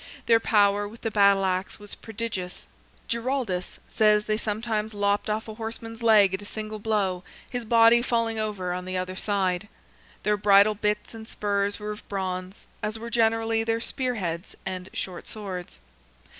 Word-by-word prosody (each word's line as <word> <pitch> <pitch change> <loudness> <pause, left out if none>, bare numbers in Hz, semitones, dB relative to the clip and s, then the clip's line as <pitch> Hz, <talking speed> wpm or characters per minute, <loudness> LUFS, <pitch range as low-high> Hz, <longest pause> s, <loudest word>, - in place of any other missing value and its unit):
Their 230 -1 +5
power 205 -2 +3
with 225 +3 -13
the 225 - -2
battle 200 -2 +5
axe 185 +1 -1
was 205 -1 -11
prodigious; 210 -5 -5 0.4
Giraldus 235 -6 -2
says 210 -1 +3
they 215 - +1
sometimes 215 0 -2
lopped 205 +1 +1
off 215 +1 -1
a 220 - -6
horseman's 225 +1 -6
leg 210 -4 +6
at 190 - -2
a - - -9
single 215 0 -5
blow, 200 -4 0 0.2
his 245 -2 -4
body 230 +1 +6
falling 230 -2 0
over 200 -4 -2
on 180 0 -4
the 185 0 -3
other 185 0 -3
side. 190 -1 0 0.6
Their 210 0 +2
bridle 205 +1 +6
bits 210 +1 -1
and 220 -1 -9
spurs 200 -1 -1
were 210 0 -5
of 210 - -10
bronze, 185 -1 -4 0.2
as 210 +1 -2
were 235 +1 -7
generally 225 0 +2
their 225 0 0
spear 250 +1 -2
heads 170 -3 -4
and 185 -1 -5
short 180 -2 -5
swords. 190 -5 -6
210 Hz, 170 wpm, -26 LUFS, 195-225 Hz, 0.6 s, leg